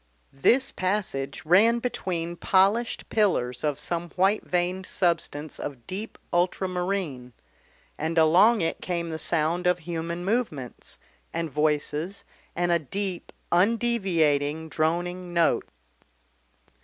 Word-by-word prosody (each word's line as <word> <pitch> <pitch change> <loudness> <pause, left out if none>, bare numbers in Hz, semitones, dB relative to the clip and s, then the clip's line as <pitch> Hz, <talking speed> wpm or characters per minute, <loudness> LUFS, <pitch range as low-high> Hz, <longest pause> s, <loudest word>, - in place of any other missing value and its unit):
This 235 - +3
passage 185 -9 -2
ran 210 +8 +5
between 175 -8 -3
polished 200 +7 +2
pillars 125 - +1
of 150 -3 0
some 170 +3 -3
white 195 +3 +2
veined 180 +1 -1
substance 165 -4 -1
of 130 -5 -6
deep 205 +4 -5 0.2
ultramarine, 180 -7 -1 0.7
and 160 +2 -2
along 180 +8 +5
it 165 - -1
came 170 -2 -3
the 160 - -4
sound 165 +3 +1
of 180 0 +3
human 170 0 -4
movements, 190 - -3 0.3
and 165 -2 -3
voices 150 +4 -1 0.3
and 175 0 +1
a 170 - +4
deep 185 +4 -4 0.2
undeviating 175 -8 +2
droning 175 +3 -1
note. 170 -1 +2
175 Hz, 110 wpm, -26 LUFS, 155-190 Hz, 0.7 s, ran